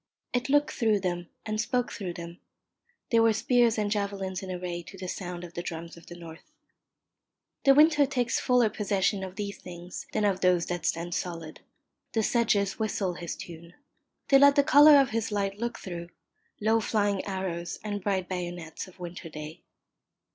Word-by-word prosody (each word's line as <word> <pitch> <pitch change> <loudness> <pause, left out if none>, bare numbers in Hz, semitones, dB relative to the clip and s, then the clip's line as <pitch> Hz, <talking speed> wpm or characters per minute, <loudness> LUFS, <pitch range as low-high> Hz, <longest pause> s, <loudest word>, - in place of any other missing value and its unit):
It 250 +2 -1
looked 290 +1 +3
through 220 -5 +1
them 175 -2 -2 0.2
and 215 0 -1
spoke 245 +2 -1
through 185 -5 -5
them. 170 0 -9 0.7
They 230 - +5
were 225 -1 +5
spears 235 +1 +3
and 210 -1 0
javelins 200 -3 -2
in 190 - -7
array 180 -1 -4
to 195 +3 -12
the 185 0 -6
sound 180 -1 -5
of 175 -1 -9
the 175 - -4
drums 170 -1 -6
of 170 - -16
the 175 - -9
north. 165 -2 -12 1.1
The 275 0 +7
winter 300 -1 +6
takes 250 -3 0
fuller 250 -2 +3
possession 200 -1 0
of 185 0 -7
these 200 -1 -5
things 175 0 -9
than 215 -1 0
of 195 -2 +1
those 180 -2 +3
that 175 0 -3
stand 170 +1 -2
solid. 165 -3 -5 0.5
The 225 - +1
sedges 210 -4 +1
whistle 205 -4 -1
his 170 -1 -5
tune. 170 0 -10 0.5
They 275 - +7
let 280 0 +7
the 285 - +5
colour 290 +1 +8
of 270 -2 +2
his 225 0 -1
light 200 -1 -1
look 235 +1 -3
through 170 -2 -7 0.5
low 220 +2 +3
flying 205 -3 0
arrows 185 -3 -3
and 205 -2 -4
bright 190 -3 0
bayonets 175 -3 -5
of 185 0 -17
winter 175 -1 -7
day. 155 0 -8
195 Hz, 180 wpm, -28 LUFS, 175-225 Hz, 1.1 s, colour